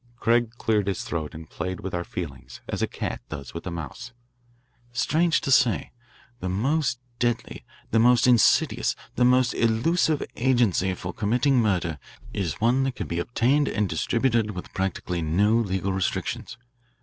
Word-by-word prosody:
Craig 120 0 +2
cleared 105 -4 +1
his 100 - -1
throat 80 -3 -4
and 80 0 -9
played 95 +4 -5
with 95 - -5
our 90 0 -1
feelings 75 -8 -7
as - - -3
a - - +2
cat - - -4
does 70 -4 -7
with 85 - -6
a - - -1
mouse. 85 - -7 0.8
"Strange 155 +8 +2
to 135 - -2
say, 125 -4 +3 0.5
the 95 - -3
most 125 - 0 0.2
deadly, 120 -1 -1 0.3
the 115 - +3
most 120 +1 +5
insidious, 120 -3 +4 0.2
the 125 - +1
most 125 -1 +4
elusive 145 +7 +2
agency 115 -7 +2
for 90 0 -6
committing 125 +5 +2
murder 90 - 0 0.3
is 85 -8 -2
one 120 +4 +3
that 135 -1 -1
can - - -4
be 85 - -3
obtained 125 +9 +2
and 105 -2 0
distributed 115 +6 +1
with 90 - -8
practically 90 -2 -2
no 90 +7 +2
legal 95 -4 0
restrictions. 95 +4 -2
110 Hz, 160 wpm, -25 LUFS, 90-125 Hz, 0.8 s, most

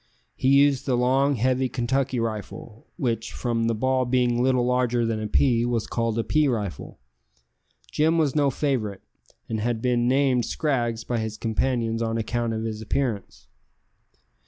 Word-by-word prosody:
He - - -1
used 140 0 +4
the 125 -2 +2
long, 135 +3 +2
heavy 130 +2 +1
Kentucky 130 +1 -1
rifle, 110 0 -6
which, 115 - -2
from 115 -2 -1
the 115 - 0
ball 130 +3 +1
being 120 -1 +1
little 125 -1 +2
larger 125 -1 +1
than 115 -1 -1
a 110 - -3
pea, 120 +1 +2
was 120 -2 -1
called 115 -1 -2
a 115 - +1
pea 155 +3 +2
rifle. 105 -8 -3 0.9
Jim 160 +2 +2
was 150 -5 +1
no 145 -2 +3
favourite, 120 -8 -2 0.5
and 110 - -3
had 115 +1 -1
been 120 0 +1
named 130 -2 +2
Scraggs 120 -7 -1
by 120 -2 -2
his 110 -1 -4
companions 115 0 -1
on 115 0 -1
account 115 +1 -1
of 110 0 -3
his 110 -1 -4
appearance. 110 -3 -3
120 Hz, 160 wpm, -24 LUFS, 115-130 Hz, 0.9 s, used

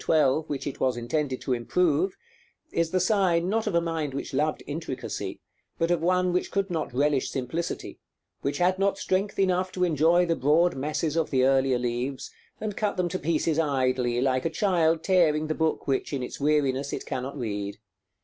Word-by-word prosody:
12, 155 0 +2
which 140 -2 -3
it 140 - -5
was 130 -2 +1
intended 130 +2 -2
to 130 - -1
improve, 160 +8 +1 0.5
is 170 -1 +1
the 185 - +1
sign, 180 -3 +2
not 220 +3 0
of 200 - 0
a - - +5
mind 160 -4 -3
which 140 - -5
loved 150 +3 0
intricacy, 145 -3 -5 0.4
but 165 +1 +1
of 175 -2 +1
one 180 +1 +2
which 180 - 0
could 195 -1 -1
not 160 -3 -2
relish 140 +2 +1
simplicity, 135 +6 -4 0.4
which 140 - -1
had 185 +1 +2
not 195 0 +2
strength 195 +2 -1
enough 185 -1 +1
to 180 0 -1
enjoy 170 +1 +4
the 165 -1 +1
broad 160 +5 +3
masses 150 +3 -2
of 165 -2 +1
the 130 -2 +2
earlier 135 -1 +3
leaves, 125 +2 -3 0.3
and 215 -2 -4
cut 205 -2 -1
them 180 -1 0
to 185 +2 -3
pieces 160 0 0
idly, 130 -5 +1
like 130 0 +1
a - - 0
child 165 -2 +2
tearing 160 -5 +3
the 155 - -1
book 160 -1 -1
which, 135 -1 0
in 135 -2 -2
its - - -6
weariness, 140 -2 +1
it - - -4
cannot 135 +1 -4
read. 100 -4 -4
155 Hz, 190 wpm, -26 LUFS, 135-180 Hz, 0.5 s, a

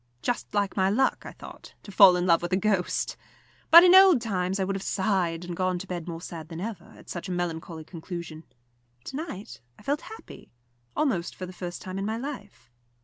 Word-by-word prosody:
Just 245 - -2
like 200 -1 0
my 190 -1 +2
luck, 260 +6 +1
I - - -7
thought, - - -13
to 200 - -10
fall 190 -2 +8
in 180 0 0
love 170 -2 +4
with 175 - -4
a - - +4
ghost! 195 -3 0 0.5
But 340 +2 +11
in 360 0 +7
old 375 -6 +8
times 190 -4 -2
I - - +1
would 195 +1 -2
have 195 - -4
sighed, 185 -4 -1
and 175 -1 -5
gone 185 0 0
to 180 - -7
bed 180 -3 -6
more 165 -1 -6
sad 165 -3 -8
than 165 -1 -7
ever, 195 -3 -7
at - - -17
such 175 +2 -6
a - - -3
melancholy 165 -2 -4
conclusion. 165 -1 -8 0.6
To - - -8
night 285 - -7 0.2
I - - -17
felt 285 +6 -1
happy, 445 - -12 0.5
almost 210 - -1
for 185 - -6
the 185 - -10
first 175 -1 -7
time 185 +1 -5
in 195 - -2
my 220 +1 -2
life. 235 - -8
185 Hz, 215 wpm, -26 LUFS, 175-215 Hz, 0.6 s, But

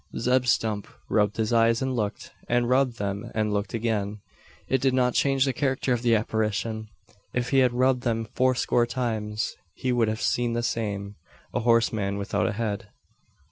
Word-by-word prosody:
Zeb 125 +2 +2
Stump 110 -4 +1 0.2
rubbed 105 -1 +2
his 110 +1 0
eyes 115 0 +4
and 130 -1 -1
looked; 105 -3 -3 0.2
and 120 0 +2
rubbed 130 -1 +2
them 100 -1 -3
and 105 -1 0
looked 100 +2 -2
again. 105 -2 -1 0.5
It 130 -1 +1
did 130 -1 +2
not 125 -1 +2
change 135 -1 +3
the 135 - 0
character 135 -2 0
of 120 - -1
the 120 -2 +4
apparition. 110 0 -1 0.5
If 125 -1 -1
he 135 - +5
had 130 -2 +4
rubbed 125 +1 +2
them 115 -2 -1
fourscore 125 -2 +2
times, 110 -3 -2 0.2
he 130 - -1
would 120 -2 +2
have 110 0 -2
seen 120 -1 0
the 120 0 -1
same 100 -3 -3 0.4
a - - +1
horseman 110 -4 +2
without 100 +1 0
a 110 - -1
head. 105 -2 -3
115 Hz, 180 wpm, -26 LUFS, 105-125 Hz, 0.5 s, he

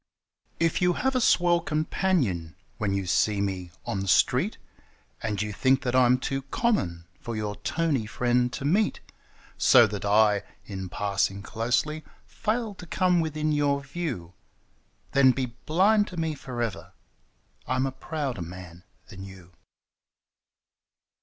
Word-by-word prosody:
If 165 +1 +1
you 180 0 +3
have 265 +7 -1
a 255 - +2
swell 175 -5 +4
companion 150 - -1 0.2
when 105 -2 0
you 100 -1 -2
see 100 +3 +2
me 95 -3 -2 0.2
on 100 - -2
the 95 - -3
street, 95 - +3 0.6
And 105 -3 -2
you 105 0 -2
think 130 +4 +2
that 125 0 -1
I'm 125 -1 +5
too 135 +1 -3
common 130 - -1
for 115 - -5
your 105 -1 -3
toney 155 -9 -1
friend 125 +1 +1
to 135 - -4
meet, 200 +8 +2 0.6
So 120 -2 +7
that 105 -1 -4
I, 105 0 +4 0.2
in 95 -2 -6
passing 100 0 -1
closely, 125 +9 -1 0.2
fail 225 0 -2
to 180 -2 -11
come 180 +1 +2
within 155 -1 -1
your 145 -1 +1
view 135 - -5 0.4
— - - -39
Then 135 -1 +5
be 125 -3 -3
blind 205 +6 +4
to 180 - -9
me 160 -1 -1
for 125 -4 -4
ever: 115 -4 -5 0.7
I'm 130 +1 +1
a 135 - -2
prouder 135 - -4
man 90 0 -9 0.3
than 95 - -9
you! 95 -2 -12
125 Hz, 145 wpm, -26 LUFS, 100-160 Hz, 0.7 s, So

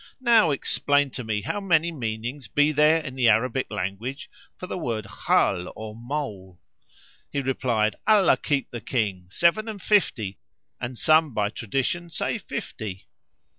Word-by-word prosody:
Now 230 -8 +5
explain 145 0 +1
to 125 - -6
me 105 -2 -2
how 205 - -2
many 170 -3 +2
meanings 120 -1 -4
be 145 +7 +3
there 155 +2 +4
in 135 -4 -7
the 125 -3 +3
Arabic 125 +4 +1
language 105 - -4 0.2
[FN#488] - - -54
for - - -5
the 180 - -5
word 115 - -3
Khal 90 -2 +1
or 110 -1 -7
mole." 115 -8 -5 0.7
He 140 - -1
replied, 125 -5 0
"Allah 210 -4 +5
keep 140 -3 -1
the 120 - -6
King! 100 -8 -2
Seven 170 - +2
and 215 -2 -5
fifty 120 - +1 0.4
and 125 0 -5
some 155 -3 +3
by 105 -1 0
tradition 135 - -2
say 160 - -2
fifty." 100 -4 -6
130 Hz, 155 wpm, -25 LUFS, 110-155 Hz, 0.7 s, Now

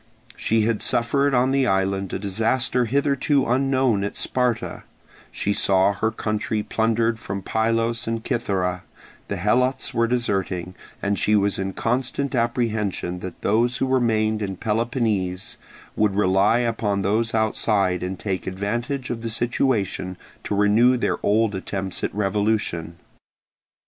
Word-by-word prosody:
She 115 0 +1
had 110 0 0
suffered 140 +4 +2
on 125 +2 +3
the 135 -1 +2
island 95 -1 0
a - - -2
disaster 115 +5 0
hitherto 140 +2 +1
unknown 130 -3 +2
at 100 - -4
Sparta; 125 -3 -1 0.5
she 100 - -1
saw 95 0 +3
her 110 +3 0
country 110 -1 -2
plundered 115 +1 0
from 100 -2 -5
Pylos 115 +2 0
and 115 0 -2
Cythera; 90 -6 -1 0.5
the 100 - -3
Helots 125 +8 +1
were 115 0 +2
deserting, 95 -7 -1 0.3
and 100 -1 0
she 105 - +3
was 100 -1 +1
in 95 0 -2
constant 130 +5 -1
apprehension 110 -7 -1
that 95 0 -8
those 120 +4 +2
who - - 0
remained 110 -4 +1
in 95 -2 -3
Peloponnese 110 -4 -1 0.4
would 105 -2 +1
rely 100 +2 +3
upon 110 -4 0
those 110 +3 +1
outside 105 -4 +1
and 90 +1 -3
take 95 -2 -3
advantage 120 +8 -3
of 115 -1 -4
the 115 - -3
situation 110 -6 -1 0.3
to 105 - -1
renew 110 +5 +4
their - - -1
old 110 +1 +2
attempts 95 0 -4
at - - 0
revolution. 100 -5 -1
110 Hz, 140 wpm, -23 LUFS, 100-120 Hz, 0.5 s, renew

